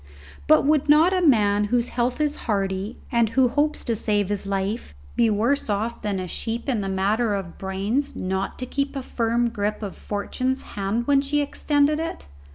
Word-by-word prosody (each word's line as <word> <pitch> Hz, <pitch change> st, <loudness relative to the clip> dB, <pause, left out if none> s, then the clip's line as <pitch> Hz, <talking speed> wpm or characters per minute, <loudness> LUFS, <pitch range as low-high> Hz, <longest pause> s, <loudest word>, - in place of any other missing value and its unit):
But -, -, +5 dB
would 295 Hz, 0 st, +2 dB
not 315 Hz, +5 st, +6 dB
a 370 Hz, -, +2 dB
man 210 Hz, -, +4 dB
whose 240 Hz, +3 st, 0 dB
health 245 Hz, +2 st, -1 dB
is 300 Hz, -1 st, +1 dB
hearty, 195 Hz, +1 st, -1 dB
and 235 Hz, -2 st, +3 dB
who 260 Hz, +3 st, +3 dB
hopes 295 Hz, +4 st, 0 dB
to 230 Hz, -, 0 dB
save 205 Hz, -2 st, +1 dB
his 205 Hz, -1 st, -3 dB
life, 195 Hz, -, -2 dB, 0.2 s
be 230 Hz, -1 st, +3 dB
worse 225 Hz, +6 st, +1 dB
off 215 Hz, +3 st, -1 dB
than 200 Hz, -2 st, -2 dB
a 185 Hz, -, -4 dB
sheep 230 Hz, +7 st, -4 dB
in 240 Hz, -6 st, 0 dB
the 195 Hz, -, -3 dB
matter 205 Hz, +3 st, +1 dB
of 190 Hz, -4 st, -6 dB
brains 200 Hz, +9 st, -2 dB
not 190 Hz, +1 st, -2 dB
to 255 Hz, -, -4 dB
keep 280 Hz, +2 st, -2 dB
a 270 Hz, -, -3 dB
firm 235 Hz, 0 st, 0 dB
grip 210 Hz, 0 st, -2 dB
of 200 Hz, -, -5 dB
Fortune's 255 Hz, +6 st, -3 dB
hand 205 Hz, +4 st, -1 dB
when 280 Hz, 0 st, +4 dB
she 290 Hz, +1 st, 0 dB
extended 290 Hz, +1 st, +1 dB
it? 330 Hz, +1 st, -4 dB
230 Hz, 190 wpm, -24 LUFS, 200-275 Hz, 0.2 s, not